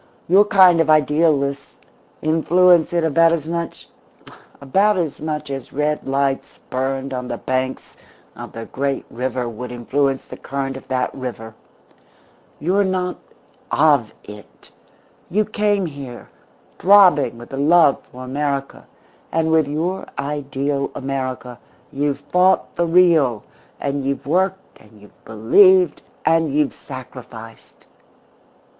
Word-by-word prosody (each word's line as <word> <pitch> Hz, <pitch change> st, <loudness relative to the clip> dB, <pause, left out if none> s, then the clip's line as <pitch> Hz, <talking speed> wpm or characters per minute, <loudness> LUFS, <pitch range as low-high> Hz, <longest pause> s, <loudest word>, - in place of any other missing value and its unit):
Your 195 Hz, +4 st, +5 dB
kind 185 Hz, -4 st, +5 dB
of 165 Hz, -, -1 dB
idealists 150 Hz, -2 st, +1 dB, 0.5 s
influence 170 Hz, +2 st, +3 dB
it 170 Hz, -1 st, 0 dB
about 165 Hz, +1 st, +4 dB
as 165 Hz, -3 st, -1 dB
much 170 Hz, +1 st, -5 dB, 0.7 s
about 195 Hz, +9 st, +2 dB
as 165 Hz, -5 st, -2 dB
much 150 Hz, -1 st, -4 dB
as 135 Hz, -2 st, -6 dB
red 150 Hz, +1 st, -2 dB
lights 135 Hz, 0 st, -1 dB
burned 135 Hz, +1 st, -2 dB
on 125 Hz, -1 st, -4 dB
the -, -, -4 dB
banks 130 Hz, 0 st, -3 dB, 0.4 s
of -, -, -9 dB
the 115 Hz, 0 st, -7 dB
great 135 Hz, +2 st, -3 dB
river 125 Hz, 0 st, -3 dB
would 120 Hz, +2 st, -7 dB
influence 135 Hz, +3 st, -1 dB
the -, -, -10 dB
current 135 Hz, -1 st, -4 dB
of 135 Hz, -, -11 dB
that 130 Hz, -1 st, -1 dB
river. 120 Hz, -4 st, -7 dB, 1.1 s
You're 185 Hz, +6 st, +1 dB
not 185 Hz, -1 st, -2 dB, 0.5 s
of 145 Hz, -7 st, +3 dB
it. 105 Hz, 0 st, -14 dB, 0.6 s
You 210 Hz, +4 st, +1 dB
came 205 Hz, -2 st, 0 dB
here, 140 Hz, -6 st, -9 dB, 0.5 s
throbbing 180 Hz, -, +5 dB
with 120 Hz, -, -12 dB
the 135 Hz, -, -6 dB
love 150 Hz, 0 st, +4 dB
for 130 Hz, +1 st, -10 dB
America; 140 Hz, +1 st, -3 dB, 0.4 s
and 160 Hz, 0 st, 0 dB
with 160 Hz, -2 st, +3 dB
your 170 Hz, +6 st, -3 dB
ideal 140 Hz, 0 st, -2 dB
America 130 Hz, -3 st, -5 dB, 0.3 s
you've 145 Hz, 0 st, -2 dB
fought 185 Hz, +1 st, +1 dB
the 170 Hz, -, 0 dB
real, 165 Hz, -10 st, +3 dB, 0.4 s
and 140 Hz, 0 st, -2 dB
you've 135 Hz, 0 st, -3 dB
worked 190 Hz, +5 st, -1 dB
and 105 Hz, 0 st, -19 dB
you've 105 Hz, 0 st, -20 dB
believed 175 Hz, -, +4 dB, 0.2 s
and 165 Hz, -2 st, +2 dB
you've 150 Hz, 0 st, +1 dB
sacrificed. 125 Hz, -4 st, -12 dB
145 Hz, 125 wpm, -20 LUFS, 130-170 Hz, 1.1 s, Your